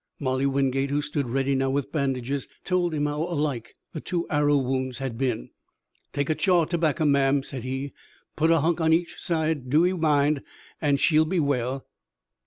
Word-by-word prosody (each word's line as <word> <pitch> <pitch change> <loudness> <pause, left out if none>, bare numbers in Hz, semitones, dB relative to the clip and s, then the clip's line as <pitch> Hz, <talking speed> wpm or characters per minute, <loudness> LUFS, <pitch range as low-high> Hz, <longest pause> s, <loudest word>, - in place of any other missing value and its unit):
Molly 130 0 0
Wingate, 135 0 +1
who 145 +1 +1
stood 140 -4 -2
ready 135 +2 0
now 135 0 +1
with 140 +1 -1
bandages, 135 -2 -1 0.2
told 180 -2 +1
him 150 -2 -1
how 150 +1 -2
alike 150 -8 -2 0.2
the 155 - -5
two 175 -2 -2
arrow 145 -1 +3
wounds 130 -1 -1
had 130 -3 -4
been. 125 - -2 0.6
"Take 140 +2 -1
an' 155 - -1
chaw 180 -4 +3
tobacker, 160 -2 0
ma'am," 140 -1 +3
said 135 -2 -6
he. 135 +2 -4 0.4
"Put 160 +1 +2
a 165 -2 +4
hunk 170 +2 +1
on 160 0 +4
each 170 +1 0
side, 160 -6 -1
do 155 +6 +4
ee 180 - +2
mind, 150 -4 +2 0.4
an' 145 -3 +2
she'll 155 +2 +4
be 175 +3 0
well." 135 -3 -1
145 Hz, 185 wpm, -25 LUFS, 135-160 Hz, 0.6 s, a